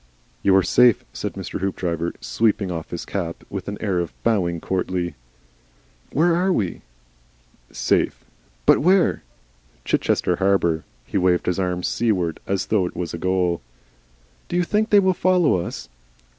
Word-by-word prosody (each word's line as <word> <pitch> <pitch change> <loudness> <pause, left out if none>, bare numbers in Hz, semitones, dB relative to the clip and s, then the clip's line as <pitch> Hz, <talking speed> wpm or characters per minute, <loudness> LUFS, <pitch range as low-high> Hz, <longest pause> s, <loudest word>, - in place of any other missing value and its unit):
"You 95 - +4
are 95 - +5
safe," 120 +5 +4
said - - -4
Mr. - - -5
Hoopdriver, 85 -3 -2
sweeping 105 -4 0
off 80 -2 -5
his 85 - -5
cap 85 -4 -4
with 100 -2 -5
an 100 0 -4
air 95 -5 0
and 85 -2 -2
bowing 90 -7 +1
courtly. 90 -1 -2 1.0
"Where 165 +4 +3
are 185 +2 +2
we?" 100 - -1 0.9
"SAFE." - - 0 0.4
"But - - +6
WHERE?" 185 +3 +3 0.6
"Chichester 90 - +1
Harbour." 95 -4 +1 0.2
He 100 - -1
waved 90 -1 +2
his 90 +1 0
arm 90 -1 -1
seaward 95 -9 0
as 95 -1 0
though 95 -5 +3
it - - -9
was 85 -2 -4
a 85 - -5
goal. 90 -3 0 0.9
"Do - - -4
you 180 - +3
think 215 +5 0
they 205 - +7
will 190 -1 +3
follow 180 - +3
us?" - - -7
95 Hz, 155 wpm, -22 LUFS, 90-115 Hz, 1.0 s, they